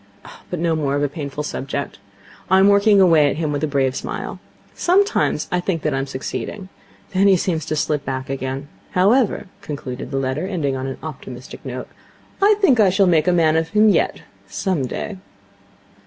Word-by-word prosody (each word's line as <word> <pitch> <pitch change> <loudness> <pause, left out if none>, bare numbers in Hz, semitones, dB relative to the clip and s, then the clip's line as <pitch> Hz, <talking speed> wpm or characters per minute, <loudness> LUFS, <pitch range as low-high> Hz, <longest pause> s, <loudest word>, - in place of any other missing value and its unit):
But 180 - -3
no 165 -1 +1
more 140 -3 0
of 145 - 0
a - - +2
painful 145 0 -5
subject. 140 -5 -4 0.5
I 190 - +5
am 195 +1 +6
working 200 0 +5
away 165 -6 +5
at - - -2
him 155 -1 -2
with 145 +1 -2
a - - +2
brave 135 -2 0
smile. - - -5 0.3
Sometimes 395 +4 +1
I 180 - +1
think 175 -2 -2
that 150 - 0
I 135 - 0
am 135 - -3
succeeding. 185 +8 -5 0.4
Then 195 +2 +4
he 195 -2 +6
seems 165 -3 -2
to 155 - -1
slip 150 -1 0
back 130 -1 -4
again. 135 +1 -4 0.3
However,' 210 +6 +3 0.2
concluded 140 -8 -6
the 135 - -3
letter, 135 +6 -1
ending 155 -9 -1
on 130 0 -4
an 135 - -5
optimistic 130 -4 -9
note, 130 -1 -6 0.5
'I 415 +2 +6
think 275 - +4
that 210 - +6
I - - +5
shall 195 +2 +3
make 170 -2 +3
a - - +5
man 160 -3 +3
of 160 0 0
him 215 +2 +4
yet 190 - +1 0.3
some 140 - -1
day.' 200 - -5
155 Hz, 200 wpm, -20 LUFS, 135-190 Hz, 0.5 s, am